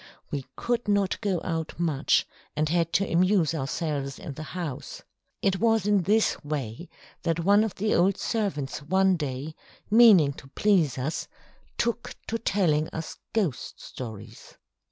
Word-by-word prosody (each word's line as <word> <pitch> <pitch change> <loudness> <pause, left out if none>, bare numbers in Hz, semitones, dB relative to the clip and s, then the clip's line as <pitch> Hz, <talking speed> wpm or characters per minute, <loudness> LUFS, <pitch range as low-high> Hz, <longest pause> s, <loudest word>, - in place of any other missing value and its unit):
We 140 -3 -4
could 240 -1 -1
not 200 -2 +1
go 195 -5 0
out 165 -1 -3
much, 155 -5 +2 0.3
and 155 +1 +1
had 170 0 +1
to 195 0 +2
amuse 175 -1 +3
ourselves 140 -1 -2
in 175 -8 -7
the 155 - -8 0.2
house. 160 -8 -5 0.4
It 190 -1 +2
was 225 -3 +3
in 205 -2 +3
this 210 +5 +2
way 145 0 -4 0.3
that 165 0 0
one 200 +4 +5
of 220 - -3
the 215 +2 0
old 185 +3 +3
servants 165 - -2
one 190 +5 +3
day, 145 -1 -4 0.4
meaning 210 -11 +7
to 135 - -13
please 185 -11 +3
us, 135 +5 -3 0.5
took 235 0 -1
to 230 - -1
telling 160 -8 +1
us 160 0 -6
ghost 165 - -2
stories. 110 -2 -9
170 Hz, 150 wpm, -27 LUFS, 145-200 Hz, 0.5 s, meaning